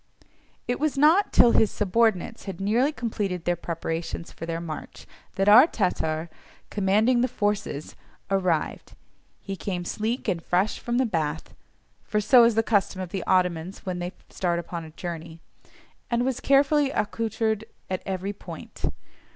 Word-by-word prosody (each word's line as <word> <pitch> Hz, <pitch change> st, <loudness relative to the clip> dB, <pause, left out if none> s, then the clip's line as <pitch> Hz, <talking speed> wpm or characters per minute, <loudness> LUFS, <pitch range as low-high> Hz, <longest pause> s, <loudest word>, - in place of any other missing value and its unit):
It 245 Hz, -, -1 dB
was 300 Hz, -1 st, 0 dB
not 315 Hz, +8 st, +5 dB
till 240 Hz, -, +6 dB
his 220 Hz, -, +4 dB
subordinates 220 Hz, +1 st, 0 dB
had 195 Hz, -4 st, -6 dB
nearly 230 Hz, +9 st, +2 dB
completed 205 Hz, -, -3 dB
their 175 Hz, -, +2 dB
preparations 165 Hz, 0 st, -4 dB
for 165 Hz, -, -8 dB
their 165 Hz, 0 st, -2 dB
march 160 Hz, -2 st, -7 dB, 0.3 s
that 195 Hz, +1 st, +1 dB
our 235 Hz, +8 st, +9 dB
Tatar, 165 Hz, -, -1 dB, 0.4 s
"commanding 210 Hz, +5 st, +3 dB
the 250 Hz, -, +3 dB
forces," 205 Hz, -, -2 dB, 0.4 s
arrived; 185 Hz, -5 st, 0 dB, 0.5 s
he 195 Hz, -, -4 dB
came 180 Hz, -1 st, -4 dB
sleek 230 Hz, +7 st, -2 dB
and 180 Hz, -5 st, 0 dB
fresh 185 Hz, +5 st, 0 dB
from 240 Hz, 0 st, -2 dB
the 260 Hz, -, +3 dB
bath 160 Hz, -7 st, -2 dB, 0.5 s
(for 210 Hz, -, -1 dB
so 235 Hz, +3 st, +6 dB
is 230 Hz, -2 st, +3 dB
the 225 Hz, -, +3 dB
custom 205 Hz, -4 st, +1 dB
of 185 Hz, -2 st, -4 dB
the 190 Hz, 0 st, -3 dB
Ottomans 180 Hz, +1 st, 0 dB
when 180 Hz, -2 st, -3 dB
they 175 Hz, +1 st, -4 dB, 0.2 s
start 175 Hz, -2 st, 0 dB
upon 170 Hz, 0 st, -5 dB
a 160 Hz, -, -10 dB
journey), 165 Hz, 0 st, -7 dB, 0.7 s
and 240 Hz, 0 st, +1 dB
was 260 Hz, -1 st, -1 dB
carefully 280 Hz, +1 st, +3 dB
accoutred 220 Hz, -2 st, -1 dB, 0.2 s
at 185 Hz, -1 st, -3 dB
every 190 Hz, +1 st, -3 dB
point. 205 Hz, -, -8 dB
195 Hz, 155 wpm, -26 LUFS, 175-230 Hz, 0.7 s, our